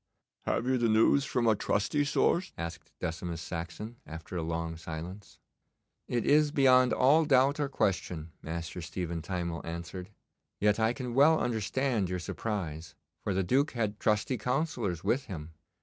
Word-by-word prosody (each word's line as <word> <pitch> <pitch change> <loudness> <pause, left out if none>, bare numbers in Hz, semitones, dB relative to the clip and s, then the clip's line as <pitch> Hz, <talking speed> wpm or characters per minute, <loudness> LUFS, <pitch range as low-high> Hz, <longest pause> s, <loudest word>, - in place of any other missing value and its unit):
'Have - - +1
you 130 0 +2
the 120 -1 +2
news 115 +6 +4
from 125 -5 0
a 110 -1 +5
trusty 105 +9 +1
source?' 160 +5 +1
asked 85 0 -6
Decimus 80 0 -3
Saxon, 85 +8 -6
after 80 +3 -8
a 85 - -1
long 80 0 -3
silence. 85 +5 -8 0.7
'It 120 -2 -1
is 150 +1 +5
beyond 130 -3 +5
all 145 +5 +5
doubt 140 0 +4
or 145 -2 0
question,' 90 - -1
Master 85 +2 -5
Stephen 85 -1 -4
Timewell 85 -1 -3
answered. 85 +3 -6 0.5
'Yet 105 +1 +3
I 110 +1 +3
can 125 -2 -5
well 150 +5 +6
understand 115 -2 0
your 90 - -1
surprise, 85 -3 -4 0.3
for 100 - -1
the 95 - +2
Duke 135 - +2
had 110 -4 -2
trusty 105 +3 +1
councillors 125 - -1
with 120 +7 +1
him. 80 -7 -7
105 Hz, 155 wpm, -30 LUFS, 85-130 Hz, 0.7 s, well